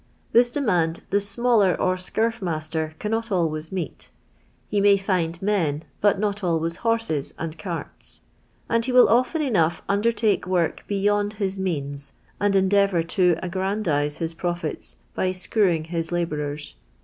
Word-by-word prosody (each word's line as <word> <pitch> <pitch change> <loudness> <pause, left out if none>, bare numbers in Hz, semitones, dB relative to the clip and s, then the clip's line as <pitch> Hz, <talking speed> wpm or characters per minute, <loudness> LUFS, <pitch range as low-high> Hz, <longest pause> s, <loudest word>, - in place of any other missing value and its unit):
This 240 +1 +5
demand 180 - 0
the 200 - +3
smaller 205 -2 +2
or 185 - +2
scurf 225 +5 -1
master 155 -2 -3
cannot 225 +1 -2
always 160 -4 -1
meet. 185 -3 -5 0.6
He 205 -1 0
may 200 0 +6
lind 170 -3 0
men, 165 -7 0 0.2
but 205 -1 +3
not 205 0 -2
always 165 -1 0
horses 225 -11 -1
Jind 160 0 -6
cart*, 170 0 -7 0.5
and 230 0 +1
he 255 - -1
will 250 0 +7
often 255 +7 +2
cnouifh 175 - +1
undertake 210 -1 +1
work 175 -3 0
beyond 205 +1 +1
his 195 -2 -3
means 145 -6 -3 0.3
and 205 0 +2
endeav«mr 190 -3 +3
to 180 -2 +3
a|.^an 190 +4 -2
dise 145 -4 0
ills 165 0 -3
profits 175 - -4 0.2
by 185 - 0
screwing 185 -2 +1
his 165 0 -4
labourers. 150 -4 -3
185 Hz, 145 wpm, -24 LUFS, 165-205 Hz, 0.6 s, will